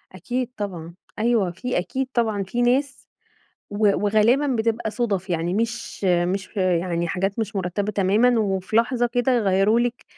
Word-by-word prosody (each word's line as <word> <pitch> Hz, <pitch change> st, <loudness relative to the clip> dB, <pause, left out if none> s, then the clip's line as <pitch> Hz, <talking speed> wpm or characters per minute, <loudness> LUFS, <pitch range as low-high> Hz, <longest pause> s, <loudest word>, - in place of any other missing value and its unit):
أكيد 245 Hz, +7 st, -3 dB
طبعًا، 175 Hz, -5 st, -5 dB, 0.3 s
أيوه، 220 Hz, -5 st, +2 dB
في 250 Hz, +8 st, -3 dB
أكيد 260 Hz, +9 st, -2 dB
طبعًا 220 Hz, -4 st, 0 dB
في 240 Hz, +6 st, -3 dB
ناس 265 Hz, +3 st, 0 dB, 0.6 s
و 205 Hz, -, -6 dB, 0.3 s
وغالبًا 225 Hz, +7 st, +3 dB
بتبقى 230 Hz, -3 st, -1 dB
صُدَف، 200 Hz, -6 st, -2 dB
يعني 170 Hz, +1 st, -1 dB
مش 230 Hz, -2 st, -3 dB
مش 185 Hz, +3 st, 0 dB
يعني 175 Hz, -2 st, 0 dB
حاجات 195 Hz, +4 st, -2 dB
مش 215 Hz, -2 st, -3 dB
مرتّبة 195 Hz, +3 st, -2 dB
تمامًا، 220 Hz, +5 st, +3 dB
وفي 195 Hz, +1 st, -1 dB
لحظة 240 Hz, +1 st, +2 dB
كده 245 Hz, +2 st, 0 dB
يغيروا 210 Hz, 0 st, +3 dB
لِك 245 Hz, 0 st, -2 dB
210 Hz, 145 wpm, -23 LUFS, 185-240 Hz, 0.6 s, وغالبًا